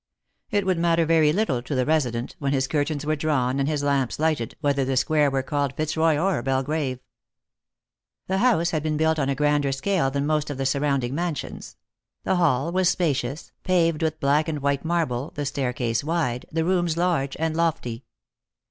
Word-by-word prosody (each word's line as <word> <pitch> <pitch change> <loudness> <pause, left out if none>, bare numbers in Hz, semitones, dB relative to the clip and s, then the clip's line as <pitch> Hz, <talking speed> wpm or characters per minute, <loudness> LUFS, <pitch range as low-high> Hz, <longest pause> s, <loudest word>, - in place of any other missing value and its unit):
It 205 -2 0
could 185 -3 +1
matter 170 -1 +2
very 160 -2 +4
little 155 - 0
to 135 +3 -4
the 130 -1 +1
resident, 125 -6 0
when 140 -1 -1
his 130 -1 +1
curtains 145 0 -1
were 155 +1 +1
drawn 140 -4 0
and 140 +1 +1
his 150 -2 -1
lamps 140 -3 0
lighted, 155 -7 -1
whether 140 -3 +1
the 130 0 -1
square 150 +1 +3
were 135 -1 -1
called 140 -1 -1
Fitzroy 155 0 +1
or 180 -3 +1
Belgrave. 135 +1 -1 1.3
The 190 +1 -1
house 195 -8 +3
had 155 - -1
been 155 0 -1
built 160 0 +2
on 135 -1 0
a 140 - 0
grander 145 0 +1
scale 135 +1 0
than 140 +1 -2
most 150 -1 0
of 145 - -4
the 135 - -2
surrounding 140 -2 0
mansions; 170 0 -4 0.5
the 185 - +1
hall 165 -2 +2
was 185 0 +2
spacious, 145 -5 -1
paved 165 -4 +2
with 160 -1 -1
black 145 +3 +2
and 150 -3 -3
white 140 -1 0
marble, 160 -6 -1
the 145 - -3
staircase 125 -4 -1
wide, 150 -6 -1
the 160 0 0
rooms 175 -2 +1
large 170 -6 0
and 160 0 -1
lofty. 155 -8 -1
150 Hz, 185 wpm, -24 LUFS, 135-165 Hz, 1.3 s, very